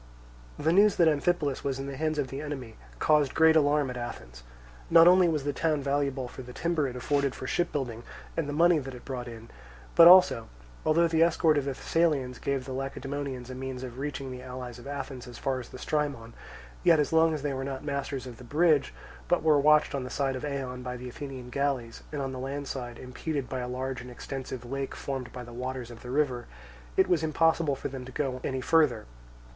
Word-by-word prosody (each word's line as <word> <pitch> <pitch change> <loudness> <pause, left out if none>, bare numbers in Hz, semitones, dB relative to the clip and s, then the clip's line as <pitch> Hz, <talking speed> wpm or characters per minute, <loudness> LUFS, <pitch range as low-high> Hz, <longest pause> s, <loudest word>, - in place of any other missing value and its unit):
The 160 +3 +1
news 205 +2 +5
that 170 - +4
Amphipolis 150 -2 +1
was 135 -2 -1
in 135 - -5
the 140 0 -5
hands 155 +2 -1
of 140 -3 -1
the 135 +2 -5
enemy 135 -6 -6 0.2
caused 150 - +3
great 160 0 +6
alarm 145 -3 +3
at 125 - -6
Athens. - - -7 0.5
Not 165 0 +8
only 180 -1 +6
was 155 -3 -1
the 145 0 -1
town 155 -1 0
valuable 140 -2 0
for 130 - -9
the 125 -1 -10
timber 165 -2 0
it 125 - -6
afforded 140 +1 0
for - - -7
shipbuilding, 130 -7 -1 0.3
and 155 -3 -1
the - - -1
money 165 +2 +4
that 135 -2 -7
it 125 - -12
brought 125 -2 -5
in; 115 -1 -10 0.4
but 170 - +9
also, 180 -10 +7 0.4
although 165 +2 +4
the 165 -1 +1
escort 165 -1 +4
of 145 -2 0
the 140 - -1
Thessalians 145 -8 0
gave 135 -2 -2
the 130 - -5
Lacedaemonians 135 -1 -4
a - - -5
means 130 0 -5
of 125 0 -7
reaching 135 -2 -4
the 125 0 -7
allies 125 -1 -7
of 120 - -11
Athens 135 -3 -6
as 120 - -10
far 130 -1 -1
as 120 - -9
the - - -9
Strymon, 140 -6 -2 0.5
yet 165 -3 +6
as 150 +1 0
long 160 0 +4
as 145 - -6
they 145 -2 -1
were 135 0 -3
not 135 0 -5
masters 140 -2 -3
of 125 -3 -9
the 125 - -12
bridge 150 +3 +2 0.3
but 175 - +2
were 155 -2 +5
watched 150 +1 +4
on 140 -2 -2
the 125 - -6
side 135 -1 -1
of 130 - -5
Eion 135 -3 -4
by 125 0 -5
the 125 +1 -7
Athenian 130 -1 -8
galleys, 135 -4 -2
and 145 -2 -3
on 135 - -3
the 130 - -6
land 140 +2 -4
side 120 -3 -5
impeded 130 +2 -4
by 130 - -4
a 125 - -3
large 130 0 -3
and 125 - -9
extensive 130 0 -6
lake 135 +2 -4
formed 135 -3 -5
by 125 -1 -7
the 120 0 -11
waters 125 0 -5
of 115 - -11
the 125 - -9
river, 130 -3 0 0.5
it - - +5
was 175 -3 +2
impossible 160 -1 +2
for - - -4
them 135 -1 -7
to 130 - -10
go 130 -1 -2
any 130 -1 -2
further. 140 -6 +3
135 Hz, 225 wpm, -28 LUFS, 125-150 Hz, 0.5 s, but